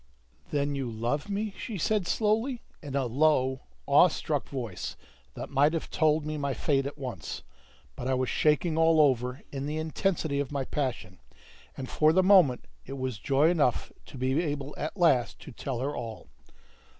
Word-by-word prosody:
"Then 145 -1 0
you 135 -4 -3
owe 145 +5 +1
me?" 205 +1 -2
she 220 - -5
said 200 +1 0
slowly, 225 +4 0 0.2
in 145 -4 -6
a 135 -2 +1
low, 130 0 +2 0.2
awe - - +6
struck - - -3
voice 120 -9 -5 0.4
that - - -7
might 145 +3 +3
have 165 - -3
told 155 -1 +2
me 155 0 -3
my 140 -2 -1
fate 135 +2 +1
at 145 - -8
once; 125 - -6 0.5
but 125 - -5
I 130 - +2
was 130 0 0
shaking 155 +4 +2
all 165 -1 +5
over 125 -3 +2
in 140 0 -4
the 150 +1 -3
intensity 160 -2 -1
of 140 -1 -2
my 140 -2 -2
passion, 125 -12 -3 0.6
and 130 - -5
for 155 +3 +3
the 185 +2 +4
moment 185 -10 +5 0.2
it - - -8
was 130 -5 -3
joy 140 +7 +3
enough 145 -8 +1 0.2
to - - -10
be 130 +5 +1
able 145 -3 -3
at 155 +6 -5
last 140 -10 +3
to - - -10
tell 125 0 -4
her 140 +2 -2
all. 115 -2 -7
145 Hz, 180 wpm, -28 LUFS, 130-160 Hz, 0.6 s, awe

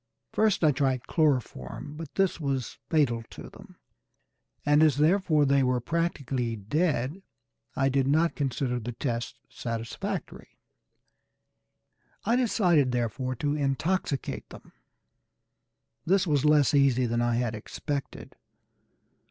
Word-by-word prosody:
First 215 -5 +2
I 155 - +6
tried 130 -2 0
chloroform, 140 - -1
but 160 -2 -9
this 195 -3 +1
was 135 -5 -3
fatal 135 -8 +2
to - - -10
them; - - -15 0.9
and 145 +1 +4
as 155 -4 +4
therefore 155 -1 +3
they 140 0 +3
were 125 -1 +2
practically 135 -5 -2
dead, 145 - -1 0.5
I 135 - +2
did 135 0 +1
not 160 +4 +3
consider 130 -3 -1
the 120 +1 -5
test 120 -1 -3
satisfactory. 115 -1 -5 1.7
I 230 +3 +3
decided 180 - +3
therefore 125 +2 -2
to 145 +4 -1
intoxicate 145 +1 -1
them. - - -13 1.3
This 190 +5 +2
was 145 -4 +1
less 150 -2 +4
easy 135 -3 +4
than 120 0 0
I 120 0 +1
had 120 -2 -1
expected. 140 +6 -6
140 Hz, 120 wpm, -27 LUFS, 125-155 Hz, 1.7 s, I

